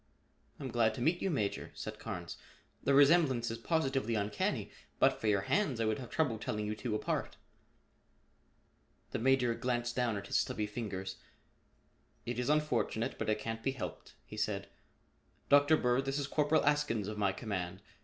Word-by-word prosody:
"I'm 135 - -4
glad 115 -2 +2
to - - -5
meet 170 +7 +2
you, 195 - +1
Major," 110 - -1
said - - -6
Carnes. - - -5 0.5
"The 140 - +3
resemblance 140 -5 +5
is 115 - -5
positively 135 -5 0
uncanny. 105 0 -1 0.3
But - - +3
for 110 - -1
your 100 -2 +3
hands, 140 - +1
I 115 - +1
would 110 +2 0
have 125 - -7
trouble 135 -9 0
telling 105 -1 -2
you 105 - -1
two 110 0 -3
apart." - - -2 1.7
The - - -2
Major 125 -1 +3
glanced 120 0 -1
down 120 -4 +1
at 100 - -6
his - - +1
stubby 105 - -1
fingers. 100 -3 -5 1.1
"It 120 0 -3
is 125 - -1
unfortunate 135 -5 0
but - - -1
it 110 - +2
can't 115 +1 -4
be 135 +3 0
helped," 130 - -7
he - - -10
said. - - -2 0.8
"Dr. 145 +2 +6
Bird, 125 +1 +2
this 135 +1 -1
is 145 - -1
Corporal 150 +2 +2
Askins 145 -8 +1
of 105 0 -4
my 100 -2 +3
command. 95 -3 -4
120 Hz, 175 wpm, -33 LUFS, 110-140 Hz, 1.7 s, Dr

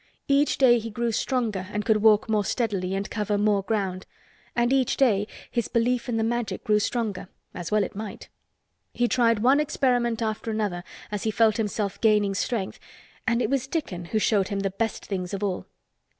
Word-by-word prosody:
Each 280 +1 +3
day 240 -3 +5
he 225 +1 -6
grew 235 +2 -1
stronger 220 -6 -1
and 210 0 -2
could 220 -2 +4
walk 215 0 +4
more 215 -2 +1
steadily 195 -5 -1
and 195 +1 -2
cover 210 -1 -1
more 205 -1 +2
ground. 195 -3 -2 0.5
And 240 +2 +2
each 265 -3 +2
day 210 -6 +3 0.2
his 235 -3 -1
belief 245 +2 0
in 230 - 0
the 225 - +1
Magic 240 0 -2
grew 210 -1 +3
stronger—as 200 -6 -4
well 215 -1 +3
it - - -6
might. 210 -1 -7 0.7
He 240 - +2
tried 230 -3 +2
one 270 +4 +5
experiment 245 -5 +1
after 220 +1 -3
another 205 -5 -2 0.3
as 210 -1 -3
he 220 - 0
felt 220 0 +3
himself 210 -2 -2
gaining 210 -3 +3
strength 195 0 -2 0.5
and 235 +1 +2
it - - 0
was 270 -1 0
Dickon 205 - -3
who 195 +6 -2
showed 205 -3 +2
him 200 -1 -2
the 195 -1 -1
best 225 +3 -3
things 185 -1 -3
of 195 - -5
all. 190 -3 -2
215 Hz, 190 wpm, -25 LUFS, 200-235 Hz, 0.7 s, day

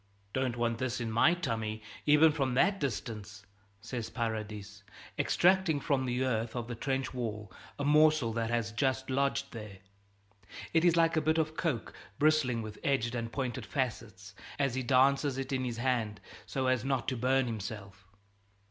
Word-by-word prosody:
"Don't 130 -2 -1
want 115 -1 0
this 130 -2 -2
in 115 -2 -3
my 120 +10 +4
tummy, 110 -8 -3 0.2
even 150 +2 +7
from 135 -4 -1
that 195 +8 +3
distance," 105 -6 -4 0.4
says 120 +1 -5
Paradis, 105 -3 -4 0.4
extracting 180 -4 +3
from 135 -2 0
the 125 +1 0
earth 115 -2 -1
of 120 -2 -3
the 120 - -4
trench 135 +3 -2
wall 110 -5 -4 0.3
a 145 - -2
morsel 150 -5 +4
that 115 0 -1
has 115 -1 -1
just 130 +2 -1
lodged 140 +1 0
there. 105 -4 -8 1.0
It 165 0 +4
is 175 -1 +5
like 165 -1 +3
a - - +3
bit 160 +2 +2
of 155 -1 0
coke, 145 - -2 0.2
bristling 145 -6 +2
with 110 -1 -8
edged 130 -4 +1
and 115 -1 -3
pointed 130 -3 -3
facets, 110 -8 -4 0.2
and 140 -3 +1
he 130 - -1
dances 135 +2 +3
it 135 0 -4
in 130 -1 0
his 120 -2 -3
hand 115 -4 -1 0.3
so 135 -1 -2
as 130 -2 +2
not 135 -2 -1
to 130 - -2
burn 130 +2 +2
himself. 105 -4 -6
125 Hz, 170 wpm, -31 LUFS, 115-140 Hz, 1.0 s, even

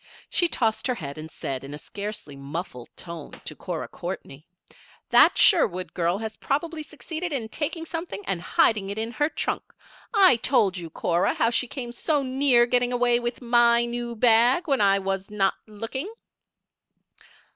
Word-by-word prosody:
She 350 - +4
tossed 225 -6 0
her 250 - 0
head 140 -6 -7
and 155 +1 -8
said, 135 -4 -5
in 140 +2 -7
scarcely 205 -3 -7
a - - -12
muffled 140 -3 -6
tone, 170 -3 -8
to - - -6
Cora - - -5
Courtney: 140 +4 -7 0.6
"That - - +6
Sherwood 185 - +4
girl 175 +1 0
has 220 0 -6
probably 310 +3 -2
succeeded 320 +3 -6
in 240 -6 -3
taking 325 +5 -3
something 325 - -6
and 185 -3 -1
hiding 200 +1 +2
it 200 - -4
in 225 +1 -2
her 295 +4 0
trunk. - - -2 0.5
I 385 - +6
told 220 -6 +2
you, 170 -3 -6
Cora, 170 +2 0
how 230 - +2
she 250 - +1
came 245 -2 -6
so 290 +4 0
near 260 -2 +4
getting 245 0 +1
away 245 -1 +2
with 240 +1 -4
my 235 0 +4
new 240 0 -4
bag 240 +8 +4
when 275 -6 +2
I 195 -1 +4
was 195 0 -3
not 200 -2 +1
looking." 230 - -5
235 Hz, 170 wpm, -25 LUFS, 195-265 Hz, 0.6 s, That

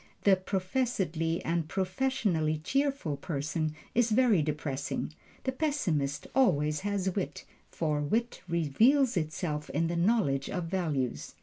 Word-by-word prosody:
The 200 -2 +6
professedly 185 - -1
and 165 -1 0
professionally 185 -5 0
cheerful 270 - 0
person 150 +1 -2 0.2
is 240 -1 +3
very 220 -5 +4
depressing. 150 -1 -3 0.3
The 260 - 0
pessimist 180 - -1
always 150 - +3
has 200 -1 -1
wit, 195 - -3 0.2
for 150 -3 -1
wit 230 +11 -1
reveals 225 - +3
itself 155 -2 -2
in 165 +2 0
the 170 - -1
knowledge 170 - +2
of 180 - -2
values. 155 - -2
170 Hz, 120 wpm, -30 LUFS, 150-220 Hz, 0.3 s, The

